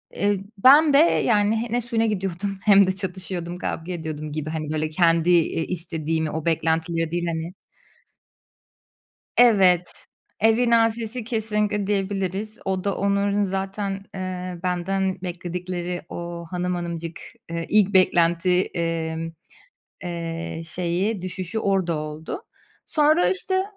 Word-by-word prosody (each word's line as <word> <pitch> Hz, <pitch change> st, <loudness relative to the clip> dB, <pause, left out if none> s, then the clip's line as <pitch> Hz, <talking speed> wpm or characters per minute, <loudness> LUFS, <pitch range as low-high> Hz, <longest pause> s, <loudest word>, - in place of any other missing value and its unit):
eee, 200 Hz, -1 st, +1 dB, 0.2 s
ben 285 Hz, +7 st, +7 dB
de, -, -, +7 dB
yani, 225 Hz, -7 st, +3 dB
ne 245 Hz, +1 st, +1 dB
suyuna 230 Hz, -1 st, 0 dB
gidiyordum 195 Hz, -2 st, -2 dB
hem 200 Hz, -1 st, +7 dB
de 190 Hz, 0 st, -1 dB
çatışıyordum, 180 Hz, -2 st, -4 dB
kavga 175 Hz, -1 st, -4 dB
ediyordum 155 Hz, -2 st, -5 dB
gibi, 155 Hz, 0 st, -4 dB
hani, 155 Hz, -1 st, -4 dB
böyle, 155 Hz, 0 st, -1 dB
kendi, 165 Hz, 0 st, +3 dB
iii, 165 Hz, -2 st, +3 dB
istediğimi 160 Hz, -2 st, -2 dB
o 160 Hz, -1 st, -4 dB
beklentileri 165 Hz, 0 st, 0 dB
değil 175 Hz, 0 st, -1 dB
hani 165 Hz, +1 st, -3 dB, 1.8 s
Evet, 185 Hz, -7 st, +5 dB, 0.5 s
"evin 225 Hz, +3 st, +3 dB
asisi" 230 Hz, +1 st, +1 dB
kesinlikle 210 Hz, -3 st, -1 dB
diyebiliriz. 195 Hz, +1 st, -2 dB
O 190 Hz, -1 st, -2 dB
da 200 Hz, -1 st, 0 dB
onların 200 Hz, +1 st, +1 dB
zaten, 195 Hz, +1 st, -2 dB, 0.2 s
eee, 185 Hz, -1 st, -5 dB
benden 190 Hz, +1 st, -1 dB
bekledikleri 180 Hz, 0 st, -4 dB
o 170 Hz, 0 st, -6 dB
hanım 180 Hz, 0 st, -1 dB
hanımcık, 170 Hz, -1 st, -5 dB, 0.3 s
ııı, 170 Hz, 0 st, -2 dB
ilk 205 Hz, -1 st, +3 dB
beklenti, 180 Hz, 0 st, +4 dB
emm, 165 Hz, -1 st, -2 dB, 0.7 s
ııı, 165 Hz, -1 st, -4 dB
şeyi, 180 Hz, +5 st, -1 dB
düşüşü 185 Hz, +3 st, -4 dB
orada 190 Hz, -5 st, +1 dB
oldu. 155 Hz, -, -6 dB, 0.4 s
Sonra, 310 Hz, +3 st, +3 dB
işte 375 Hz, 0 st, 0 dB
185 Hz, 120 wpm, -23 LUFS, 170-205 Hz, 1.8 s, ben